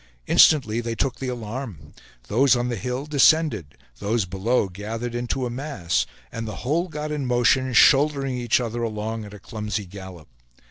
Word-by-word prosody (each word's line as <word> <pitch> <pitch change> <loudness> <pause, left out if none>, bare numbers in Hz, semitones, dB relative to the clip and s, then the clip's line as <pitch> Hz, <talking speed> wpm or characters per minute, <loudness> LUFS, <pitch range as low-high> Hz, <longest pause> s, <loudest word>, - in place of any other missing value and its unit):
Instantly 120 - +5
they 115 0 -3
took 130 +2 -1
the 130 - -5
alarm; 115 - -6 0.3
those 130 +4 +4
on 120 0 -1
the 120 - -1
hill 125 +6 -4
descended; 150 - +2 0.2
those 110 0 0
below 95 +5 0
gathered 110 +5 -5
into 120 +2 -2
a 120 - -3
mass, 120 - -2 0.2
and 115 0 -5
the 105 - -5
whole 165 +7 +1
got 150 -2 -5
in 150 -2 -2
motion, 125 +2 +2
shouldering 135 +1 +4
each 120 -1 +1
other 120 -1 -3
along 110 0 -3
at 105 - -11
a - - -9
clumsy 105 -1 -4
gallop. 95 -3 -11
120 Hz, 170 wpm, -23 LUFS, 105-130 Hz, 0.3 s, Instantly